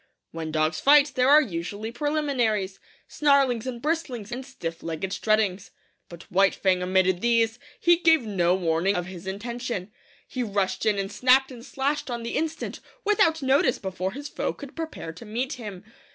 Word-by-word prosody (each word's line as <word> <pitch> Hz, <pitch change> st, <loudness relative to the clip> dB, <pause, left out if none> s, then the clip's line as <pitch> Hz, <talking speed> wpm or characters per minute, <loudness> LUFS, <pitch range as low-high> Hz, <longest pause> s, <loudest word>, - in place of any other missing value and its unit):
'When 160 Hz, -1 st, -5 dB
dogs 155 Hz, +1 st, 0 dB
fight 290 Hz, 0 st, +6 dB
there 255 Hz, +1 st, +3 dB
are 300 Hz, +2 st, +8 dB
usually 205 Hz, -, -5 dB
preliminaries 240 Hz, -8 st, -1 dB, 0.3 s
snarlings 275 Hz, -5 st, +2 dB
and 245 Hz, -2 st, -4 dB
bristlings, 265 Hz, -7 st, -3 dB
and 250 Hz, +2 st, -4 dB
stiff 170 Hz, -11 st, -6 dB
legged 165 Hz, +3 st, -4 dB
struttings. 210 Hz, -3 st, 0 dB, 0.4 s
But 170 Hz, -1 st, -11 dB
White 195 Hz, +1 st, +4 dB
Fang 185 Hz, -2 st, +1 dB
omitted 185 Hz, 0 st, +2 dB
these. 230 Hz, -1 st, +2 dB, 0.2 s
He 345 Hz, 0 st, +5 dB
gave 325 Hz, -5 st, +4 dB
no 185 Hz, -5 st, +1 dB
warning 175 Hz, +2 st, +1 dB
of 180 Hz, -1 st, -1 dB
his 185 Hz, 0 st, -9 dB
intention. 225 Hz, 0 st, -4 dB, 0.4 s
He 255 Hz, -, -4 dB
rushed 200 Hz, -3 st, -1 dB
in 210 Hz, -2 st, +3 dB
and 195 Hz, 0 st, -2 dB
snapped 255 Hz, +5 st, +4 dB
and 240 Hz, -2 st, -10 dB
slashed 275 Hz, +2 st, -2 dB
on 240 Hz, -1 st, -4 dB
the 235 Hz, -, -4 dB
instant, 320 Hz, 0 st, -3 dB, 0.3 s
without 325 Hz, -7 st, +3 dB
notice, 265 Hz, -1 st, +3 dB
before 190 Hz, -1 st, -4 dB
his 285 Hz, +2 st, -6 dB
foe -, -, -3 dB
could 280 Hz, -1 st, -11 dB
prepare 320 Hz, -, -6 dB
to 175 Hz, -, -11 dB
meet 240 Hz, +6 st, -3 dB
him. 210 Hz, -7 st, -8 dB
230 Hz, 170 wpm, -25 LUFS, 190-270 Hz, 0.4 s, are